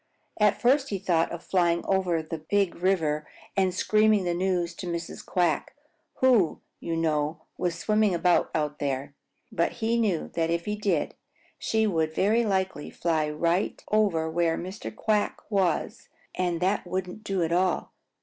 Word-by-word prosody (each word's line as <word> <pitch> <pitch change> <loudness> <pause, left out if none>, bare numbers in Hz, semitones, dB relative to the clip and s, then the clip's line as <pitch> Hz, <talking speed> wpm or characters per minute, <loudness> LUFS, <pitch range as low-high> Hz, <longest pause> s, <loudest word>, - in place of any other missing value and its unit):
At 210 -1 +3
first 270 +3 +3
he 200 - -1
thought 175 -3 +1
of 170 0 -6
flying 170 -2 +1
out - - -7
over 180 -4 +1
the 160 +1 -5
Big 195 +4 +1
River 160 -5 0 0.3
and 190 -2 +2
screaming 215 +2 +3
the 175 -1 0
news 175 -1 0
to 180 - -6
Mrs. 170 -1 -5
Quack, 175 -5 0 0.4
who, 240 -10 +3 0.2
you 165 -1 -3
know, 155 -1 0
was 175 -1 -2
swimming 210 0 +2
about 175 +1 +3
out 150 -1 -1
there. 140 0 -2 0.4
But 170 - 0
he 230 0 0
knew 195 -8 0
that 165 -1 0
if 170 0 -1
he 210 - -1
did, 200 -7 0 0.5
she 220 0 +1
would 160 -6 0
very 220 +5 +3
likely 190 -7 -1
fly 160 -3 0
right 170 +5 0
over 200 -7 +2
where 165 0 +1
Mr. 185 +4 -6
Quack 215 -2 0
was, 190 -5 0 0.2
and 175 -2 -1
that 190 +1 0
wouldn't 185 +3 -4
do 195 -4 0
at 165 - -1
all. 180 0 +1
180 Hz, 165 wpm, -27 LUFS, 165-200 Hz, 0.5 s, At